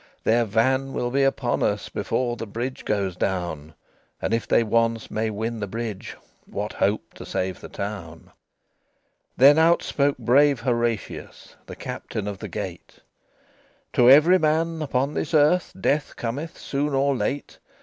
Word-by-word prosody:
"Their 115 Hz, +1 st, +3 dB
van 130 Hz, +5 st, +1 dB
will 120 Hz, 0 st, -2 dB
be 140 Hz, +2 st, +2 dB
upon 135 Hz, 0 st, +1 dB
us -, -, 0 dB
Before 120 Hz, -2 st, -2 dB
the 115 Hz, -, -6 dB
bridge 120 Hz, +5 st, -5 dB
goes 100 Hz, -4 st, -1 dB
down; 85 Hz, -5 st, -3 dB, 0.4 s
And -, -, -2 dB
if 115 Hz, -, -1 dB
they -, -, +4 dB
once 115 Hz, 0 st, 0 dB
may 110 Hz, +1 st, -1 dB
win 110 Hz, +2 st, -3 dB
the 105 Hz, -, -3 dB
bridge, 110 Hz, -1 st, -5 dB, 0.3 s
What -, -, -4 dB
hope -, -, -1 dB
to -, -, -10 dB
save 95 Hz, -1 st, -3 dB
the -, -, -9 dB
town?" 100 Hz, -5 st, -6 dB
XXVII -, -, -23 dB, 1.1 s
Then 140 Hz, +3 st, +7 dB
out 165 Hz, +1 st, +4 dB
spake 140 Hz, 0 st, 0 dB
brave 140 Hz, 0 st, +3 dB
Horatius, 120 Hz, -4 st, -3 dB
The -, -, -8 dB
Captain 105 Hz, -1 st, -5 dB
of 100 Hz, -2 st, -5 dB
the -, -, -6 dB
Gate: -, -, -7 dB, 0.9 s
"To 120 Hz, 0 st, +5 dB
every 160 Hz, +7 st, +7 dB
man 160 Hz, +1 st, +1 dB
upon 140 Hz, -1 st, 0 dB
this 155 Hz, -, -2 dB
earth 155 Hz, +4 st, +3 dB
Death 145 Hz, +8 st, 0 dB
cometh 140 Hz, +8 st, -5 dB
soon 140 Hz, 0 st, -2 dB
or 140 Hz, +1 st, +2 dB
late. 140 Hz, +2 st, -3 dB
120 Hz, 160 wpm, -24 LUFS, 110-140 Hz, 1.1 s, Then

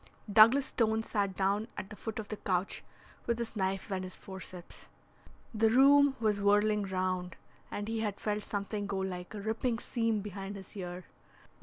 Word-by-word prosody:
Douglas 230 Hz, +6 st, +8 dB
Stone 220 Hz, -1 st, +1 dB
sat 200 Hz, -4 st, -1 dB
down 200 Hz, +3 st, +1 dB
at 195 Hz, -, -6 dB
the -, -, -6 dB
foot 220 Hz, +1 st, -5 dB
of 215 Hz, -2 st, -5 dB
the 215 Hz, -, -4 dB
couch 185 Hz, -1 st, -1 dB, 0.4 s
with 235 Hz, -, +1 dB
his 235 Hz, -1 st, -4 dB
knife 195 Hz, 0 st, -1 dB
and 190 Hz, -1 st, -1 dB
his 185 Hz, 0 st, -7 dB
forceps. 185 Hz, -2 st, -9 dB, 0.7 s
The 220 Hz, 0 st, +3 dB
room 280 Hz, +3 st, +6 dB
was 210 Hz, -3 st, +1 dB
whirling 205 Hz, +1 st, +3 dB
round, 185 Hz, -1 st, -2 dB, 0.3 s
and 205 Hz, 0 st, -4 dB
he 225 Hz, 0 st, -1 dB
had 210 Hz, -2 st, -2 dB
felt 210 Hz, 0 st, -1 dB
something 205 Hz, 0 st, -3 dB
go 200 Hz, -1 st, -2 dB
like 185 Hz, 0 st, -4 dB
a -, -, -4 dB
ripping 225 Hz, +3 st, 0 dB
seam 225 Hz, -2 st, 0 dB
behind 200 Hz, 0 st, -6 dB
his 195 Hz, +2 st, -11 dB
ear. 180 Hz, -2 st, -6 dB
205 Hz, 175 wpm, -32 LUFS, 190-220 Hz, 0.7 s, Douglas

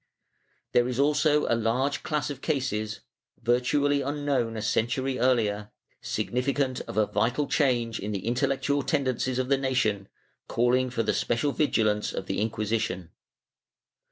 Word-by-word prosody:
There 120 Hz, 0 st, +3 dB
is 125 Hz, 0 st, -3 dB
also 150 Hz, +1 st, +3 dB
a -, -, +1 dB
large 120 Hz, +5 st, 0 dB
class 150 Hz, -2 st, -2 dB
of 140 Hz, -2 st, -8 dB
cases, 110 Hz, -8 st, -2 dB, 0.4 s
virtually 140 Hz, +4 st, +2 dB
unknown 140 Hz, -5 st, -1 dB
a -, -, -3 dB
century 125 Hz, +5 st, 0 dB
earlier, 105 Hz, -5 st, +1 dB, 0.3 s
significant 130 Hz, +1 st, -1 dB
of -, -, -6 dB
a 110 Hz, -, +4 dB
vital 120 Hz, +8 st, 0 dB
change 120 Hz, -6 st, +1 dB
in 105 Hz, -, -4 dB
the 100 Hz, -2 st, -4 dB
intellectual 135 Hz, +4 st, +1 dB
tendencies 130 Hz, -3 st, 0 dB
of 130 Hz, 0 st, -1 dB
the 140 Hz, -1 st, +3 dB
nation, 115 Hz, -7 st, 0 dB, 0.4 s
caUing 125 Hz, +2 st, +2 dB
for 115 Hz, -2 st, 0 dB
the -, -, +1 dB
special 120 Hz, +5 st, 0 dB
vigilance 110 Hz, -8 st, +1 dB
of 95 Hz, -, -4 dB
the 95 Hz, -, -2 dB
Inquisition. 110 Hz, -5 st, -2 dB
125 Hz, 140 wpm, -27 LUFS, 110-140 Hz, 0.4 s, a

